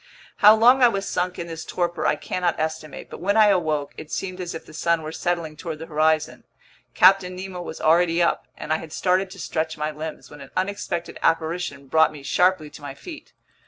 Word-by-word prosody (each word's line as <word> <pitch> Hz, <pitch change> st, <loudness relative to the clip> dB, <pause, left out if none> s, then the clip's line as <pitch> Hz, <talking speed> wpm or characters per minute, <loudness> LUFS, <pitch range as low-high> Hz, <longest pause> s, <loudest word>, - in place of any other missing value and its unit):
How 210 Hz, 0 st, +8 dB
long 245 Hz, +4 st, +5 dB
I 245 Hz, -, +8 dB
was 195 Hz, -4 st, -2 dB
sunk 180 Hz, 0 st, -2 dB
in 170 Hz, -, -4 dB
this 165 Hz, -1 st, -7 dB
torpor 175 Hz, -2 st, -1 dB
I -, -, +3 dB
cannot 175 Hz, +2 st, -2 dB
estimate; 155 Hz, -1 st, -4 dB
but -, -, -8 dB
when 200 Hz, +5 st, +1 dB
I 215 Hz, -1 st, +7 dB
awoke, 155 Hz, -7 st, 0 dB
it 155 Hz, -, -9 dB
seemed 185 Hz, -1 st, -4 dB
as 175 Hz, -1 st, -5 dB
if 165 Hz, -, -8 dB
the -, -, -14 dB
sun 170 Hz, 0 st, 0 dB
were 155 Hz, -, -5 dB
settling 170 Hz, -2 st, -2 dB
toward 160 Hz, 0 st, -6 dB
the 160 Hz, -, -8 dB
horizon. 155 Hz, -1 st, 0 dB, 0.5 s
Captain 185 Hz, 0 st, +5 dB
Nemo 185 Hz, -1 st, -6 dB
was 160 Hz, -, -7 dB
already 165 Hz, +1 st, +3 dB
up, 170 Hz, -, +1 dB
and 155 Hz, -, -2 dB
I -, -, +2 dB
had 160 Hz, -, -10 dB
started 185 Hz, +3 st, +1 dB
to 190 Hz, -, -11 dB
stretch 160 Hz, -3 st, -3 dB
my 150 Hz, 0 st, -2 dB
limbs, 155 Hz, +1 st, -8 dB
when 145 Hz, -1 st, -12 dB
an 135 Hz, -, -11 dB
unexpected 185 Hz, -3 st, -3 dB
apparition 165 Hz, -3 st, -1 dB
brought 160 Hz, +3 st, +4 dB
me 150 Hz, -2 st, -11 dB
sharply 165 Hz, +1 st, +2 dB
to -, -, -12 dB
my 140 Hz, -1 st, -7 dB
feet. 330 Hz, -, -11 dB
170 Hz, 215 wpm, -23 LUFS, 155-185 Hz, 0.5 s, How